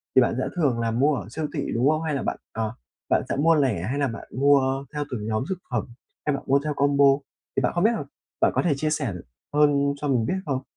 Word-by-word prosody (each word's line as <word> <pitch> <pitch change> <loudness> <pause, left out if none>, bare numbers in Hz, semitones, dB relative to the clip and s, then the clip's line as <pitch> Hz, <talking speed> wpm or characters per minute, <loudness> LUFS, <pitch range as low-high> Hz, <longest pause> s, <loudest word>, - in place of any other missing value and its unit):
thì 130 - +8
bạn 120 - +2
sẽ - - 0
thường 140 -9 +1
là 115 -1 0
mua 140 +6 +3
ở 120 - -5
siêu 155 +2 -3
thị, - - -2
đúng 125 +5 +3
không? 155 +1 +1
Hay 155 -3 -1
là - - -2
bạn, - - -2 0.2
ờ, 110 -1 -2 0.4
bạn - - +3
sẽ - - 0
mua 160 +4 +4
lẻ 130 - +1
hay 130 +8 -2
là 140 - +2
bạn 115 -2 -7
mua 135 0 +3
theo 150 0 -2
từng 110 -4 -4
nhóm 110 +2 0
thực 190 - -1
phẩm? 120 -4 0 0.4
Hay 150 - +1
bạn 140 - -6
mua 140 +1 +4
theo 150 -1 -1
combo? 140 0 +3 0.5
Thì - - +2
bạn 125 - +1
không 175 - +1
biết 220 - +5
l - - -3 0.4
bạn - - +5
có - - +3
thể 170 -5 +2
chia 155 +3 -1
sẻ 145 -8 -1 0.4
hơn 140 -1 +3
cho 145 - -3
mình 125 -5 +2
biết - - 0
không? 135 -4 -1
140 Hz, 270 wpm, -25 LUFS, 125-150 Hz, 0.5 s, thì